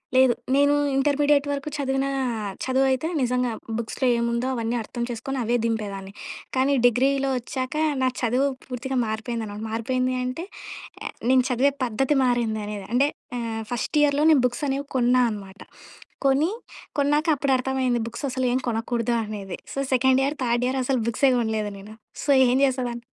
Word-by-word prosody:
లేదు. 260 -1 +6 0.2
నేను 285 +1 +4 0.2
ఇంటర్మీడియట్ 290 +1 +3
వరకు 280 +1 -3
చదివిన 270 -1 0 0.6
చదువయితే 265 +2 +2
నిజంగా 250 0 +1 0.3
బుక్స్‌లో 235 +3 -2
ఏముందో 235 +1 0
అవన్నీ 230 0 -1
అర్థం 235 +2 -5
చేసుకొని 250 +3 -4
అవే 235 +2 +1
దింపేదాన్ని. 200 -4 -3 0.4
కానీ, 270 +2 +3
డిగ్రీలో 270 +3 +3
వచ్చాక 255 +3 -4 0.3
నా 255 - +4
చదువు 250 +3 +2 0.2
పూర్తిగా 260 +1 -4
మారిపోయిందనమాట, 220 -1 -4
మారిపోయింది 255 +3 0
అంటే 255 +7 -4 0.8
నేను 260 0 +6
చదివే 260 +3 +3
పద్ధతి 265 +5 0
మారింది 235 -3 0
అనేద. 210 -2 -5
అంటే 270 +4 +4 0.3
ఆహ్, 225 -2 -3
ఫస్ట్ 245 +5 -2
ఇయర్‌లో 290 0 +3
నేను 290 -4 +5
బుక్స్ 245 +5 -7
అనేవి 275 +1 -1
కొన్నా 250 0 +4
అనమాట. 200 -1 -9 0.6
కొని, 275 +3 +4 0.5
కొన్నాక 295 +2 +2
అప్పుడు 280 0 0
అర్థమయ్యింది 255 -1 0
బుక్స్ 235 +4 -7
అసలు 260 0 -1
ఏం - - +3
కొనకూడదు 235 +1 -1
అనేది. 205 -3 -6 0.2
So, - - -8
second 260 0 +4
year, 280 +3 0
third 240 0 +1
year 260 +1 0
అసలు 255 0 0
బుక్సే 235 +4 +3
కొనలేదు 220 -2 -1
నేను. 205 +2 -11 0.3
సో, 285 - +2 0.2
ఏం 250 +1 +3
చేసేదాన్ని, 250 -3 -1
250 Hz, 150 wpm, -24 LUFS, 230-270 Hz, 0.8 s, లేదు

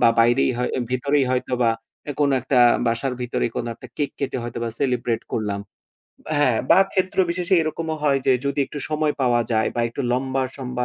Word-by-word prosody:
বা - - +6
বাইরেই 120 +3 +4
হয় 125 - 0
অ্যা 125 - -1
ভিতরেই 140 +2 +2
হয়তোবা 125 -2 +1 0.3
অ্যা 145 - -4
কোন 140 -1 +3
একটা 130 +1 +1 0.3
বাসার 115 +3 0
ভিতরেই 125 -1 -1
কোন - - -1
একটা - - -12
কেক 145 -2 -1
কেটে 135 -2 -2
হয়তোবা 120 0 -4
সেলিব্রেট 120 -4 0
করলাম। 100 -2 -2 0.8
হ্যাঁ, 125 -6 +3
বা - - +8
ক্ষেত্রবিশেষে 185 -1 +1
এরকমও 160 0 -3
হয় 140 -2 +3
যে 135 - +6
যদি 140 +1 -1
একটু 145 - -7
সময় 155 -1 +1
পাওয়া 120 -2 +3
যায় 110 0 +2
বা 120 - 0
একটু 115 - -6
লম্বা 130 +1 0
সম্বা, 125 -2 -3
130 Hz, 185 wpm, -22 LUFS, 120-145 Hz, 0.8 s, বা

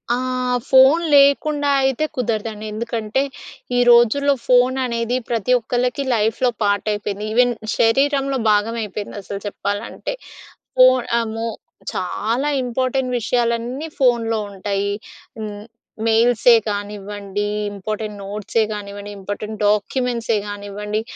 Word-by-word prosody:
ఆహ్, 255 0 -1
ఫోన్ 265 +6 +6
లేకుండా 285 +1 +4
అయితే 265 +3 +1
కుదరదండి. 220 -3 -2
ఎందుకంటే, 230 +1 -2 0.6
ఈ - - +4
రోజుల్లో 240 +5 +5
ఫోన్ 250 +1 +4
అనేది 235 0 -1
ప్రతి 235 +1 0
ఒక్కళ్ళకి 250 +4 -1
లైఫ్‍లో 225 +3 +1
పార్ట్ 205 +1 +1
అయిపోయింది. 205 0 -3
ఈవెన్ 245 +1 +4 0.3
శరీరంలో 275 +3 +2
భాగం 210 +2 +1
అయిపోయింది 205 0 -6
అసలు 200 +1 -6
చెప్పాలంటే. 205 - -4 0.7
ఫోన్ 255 -1 +6 0.2
అమో, 225 0 -3 0.4
చాలా 230 +9 -1
ఇంపార్టెంట్ 255 +1 -1
విషయాలన్నీ 240 +5 -1
ఫోన్‌లో 230 -3 +2
ఉంటాయి. 200 +1 -2 0.5
హ్మ్. 210 -1 -6 0.4
మెయిల్సే 235 +1 +5 0.2
కానివ్వండి, 205 0 -4 0.3
ఇంపార్టెంట్ 210 +1 -5
నోట్సే 210 +2 -1
కానివ్వండి, 205 0 -6
ఇంపార్టెంట్ 205 +2 -5
డాక్యుమెంట్సే 230 +2 0
కానివ్వండి 205 +1 -4
225 Hz, 105 wpm, -20 LUFS, 205-250 Hz, 0.7 s, ఫోన్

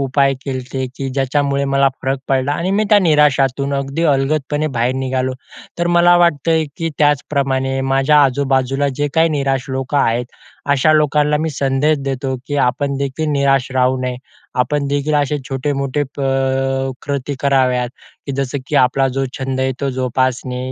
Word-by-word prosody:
उपाय 135 0 +2
केलते, 130 -1 -4
की 135 - -3
ज्याच्यामुळे 140 +1 0
मला 135 0 +4
फरक 135 +1 -1
पडला 135 +1 +1
आणि 170 +5 -2
मी 210 +2 +2
त्या 210 - +7
निराशातून 140 -4 +2
अगदी 140 +3 -2
अलगदपणे 145 +2 -1
बाहेर 120 +2 +1
निघालो. 130 0 -1 0.5
तर 175 - 0
मला 175 0 +6
वाटतंय 165 -1 +2
की 165 0 -2
त्याचप्रमाणे 135 -2 +1
माझ्या 135 +2 +3
आजूबाजूला 135 0 +1
जे 145 +1 0
काही 165 0 +4
निराश 135 -4 -1
लोकं 135 +2 -1
आहेत. 120 -1 +1 0.5
अशा 145 +2 +4
लोकांना 150 -1 +2
मी 160 0 -1
संदेश 140 +2 +1
देतो, 135 -1 -2
की 145 - -2
आपणदेखील 140 +3 -1
निराश 135 -2 +1
राहू 130 0 +2
नये. 125 -1 -3 0.4
आपणदेखील 145 +3 0
असे 145 0 +1
छोटे-मोठे 140 +1 -1
प - - -5 0.8
कृती 140 -1 -3
कराव्यात, 130 -3 +2 0.4
की 140 - -3
जसं 135 +1 -2
की 150 - -1
आपला 135 +1 +3
जो 135 - +1
छंद 130 0 -2
आहे 130 0 0
तो 140 -1 -1
जोपासणे, 130 0 -1
140 Hz, 150 wpm, -17 LUFS, 130-145 Hz, 0.8 s, त्या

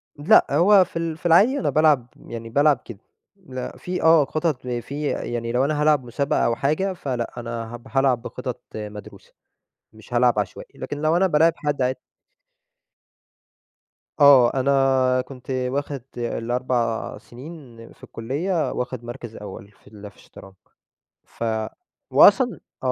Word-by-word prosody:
لأ 155 +10 +5
هو 190 +1 +5
في 165 - -6
ال 165 -1 -3
في - - -24
العادي 205 +12 +5
أنا - - 0
بالعب 150 -6 +3 0.2
يعني 115 -1 -8
بالعب 145 +2 +3
كده، 115 -5 -10 0.4
لأ 130 -10 -8
في 180 0 -4
آه 160 -2 +6
خطط 155 -4 -2
في 140 +5 -4
يعني 115 -3 -3
لو 125 +3 +2
أنا 150 +1 -1
هالعب 150 -3 +3
مسابقة 140 +4 -1
أو 115 - +1
حاجة 155 +10 0
فلأ، 125 -9 -4
أنا 115 -1 -6
هب 120 - -13
هالعب 135 -3 +2
بخطط 125 0 -6
مدروسة، 105 -1 -9 0.6
مش 110 +2 -12
هالعب 120 -2 +3
عشوائي، 100 -3 -5
لكن 145 - -5
لو 155 +2 +2
أنا 190 +2 +3
بالاعب 165 -1 +3
حد 145 -4 -2
عاد 130 +1 0 2.2
آه 140 -4 +7
أنا 130 -1 +2
كنت 130 0 -10
واخد 130 +2 -2 0.2
ال4 120 0 -2
سنين 135 0 -12 0.2
في - - -28
الكلية 155 +9 -2
واخد 125 -1 -4
مركز 120 -1 -8
أول، 100 0 -10
في - - -22
ال 105 -1 -11
في - - -29
الشطرنج، 95 - -15 0.7
ف - - -9 0.7
وأصلًا 250 -3 +5 0.2
آه، 130 - +1
130 Hz, 145 wpm, -23 LUFS, 120-155 Hz, 2.2 s, آه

